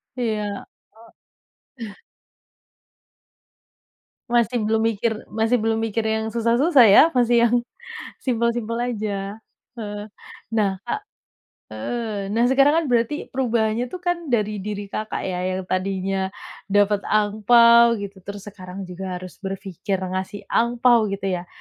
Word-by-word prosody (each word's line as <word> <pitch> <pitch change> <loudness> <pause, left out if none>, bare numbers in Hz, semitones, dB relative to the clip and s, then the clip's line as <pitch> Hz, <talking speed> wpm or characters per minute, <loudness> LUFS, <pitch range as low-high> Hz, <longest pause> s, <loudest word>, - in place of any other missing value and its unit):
Iya. 210 -4 -3 0.3
O 230 +1 -20 0.6
eh. 205 - -10 2.4
Masih 240 0 +2
belum 220 +1 +1
mikir, 225 0 0 0.2
masih 225 +2 +1
belum 225 -1 0
mikir 225 0 -1
yang 220 0 -1
susah-susah, 240 +5 +4
ya. - - +9
Masih 240 -1 +4
yang 235 - -2 0.7
simpel-simpel 235 -2 -1 0.2
aja. 205 -2 -4 0.4
Heeh. 210 -1 -6 0.4
Nah, 215 -3 +2
Kak, - - -3 0.7
eee, 205 - -4
nah, 225 +4 +1
sekarang 275 +6 +4
kan - - -4
berarti 235 +4 +2 0.2
perubahannya 235 -2 0
itu 365 - -7
kan 350 -2 -1
dari 215 -5 0
diri 205 0 -6
Kakak, 215 0 -4
ya. 180 -1 -3 0.2
Yang 190 - -4
tadinya 190 0 -1 0.4
dapat 205 0 +3
angpao 235 +3 +5
gitu, 200 -2 -7
terus 200 +1 -9
sekarang 185 0 -9
juga 185 0 -6
harus 185 0 -9
berpikir 195 -1 -4 0.2
ngasih 190 +2 -4
angpao, 235 -1 +3
gitu 195 0 -5 0.2
ya. 175 - -11
220 Hz, 125 wpm, -22 LUFS, 200-235 Hz, 2.4 s, ya